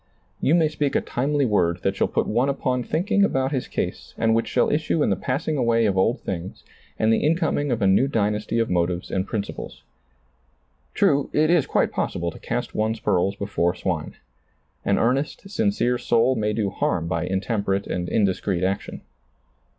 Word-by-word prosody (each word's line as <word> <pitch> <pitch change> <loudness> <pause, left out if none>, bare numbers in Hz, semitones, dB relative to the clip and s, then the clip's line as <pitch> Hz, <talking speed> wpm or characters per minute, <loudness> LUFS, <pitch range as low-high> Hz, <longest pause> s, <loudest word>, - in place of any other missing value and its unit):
You 155 - +3
may 165 -2 +4
speak 150 -2 -2
a - - +3
timely 140 +2 0
word 90 -6 +1
that 95 - 0
shall - - +1
put - - 0
one 120 +5 +1
upon 130 -2 -1
thinking 185 - +1
about 135 -8 +1
his 130 -4 -2
case - - -4
and 115 0 +2
which 115 +1 +1
shall - - +1
issue 155 0 +1
in - - +1
the - - +3
passing 145 +4 -2
away 115 -3 +2
of 100 -3 +1
old 115 +7 +1
things 90 -1 -6 0.3
and 110 +1 +3
the - - +2
incoming 155 -2 +1
of 115 -4 0
a - - +4
new 100 +8 +4
dynasty 105 -2 -1
of 115 -1 +2
motives 90 0 -1
and 95 +1 -1
prin 105 -3 -1
ciples. - - -9 1.1
True, 140 0 +2
it 155 +2 +3
is 175 -6 +3
quite - - +1
possible 85 0 -2
to - - -12
cast - - -3
one's 110 +1 -1
pearls 100 -2 +1
be 100 - -4
fore 90 -3 0
swine. 85 -6 -3 0.7
An 100 - +2
earnest, 135 - 0
sincere 200 - 0
soul 120 +2 +3
may 105 -2 0
do 105 -3 -1
harm 85 -2 -1
by 85 +1 -1
intemperate 100 +1 -1
and 90 0 -3
indiscreet 95 -3 0
action. 95 +1 -2
115 Hz, 190 wpm, -23 LUFS, 95-140 Hz, 1.1 s, may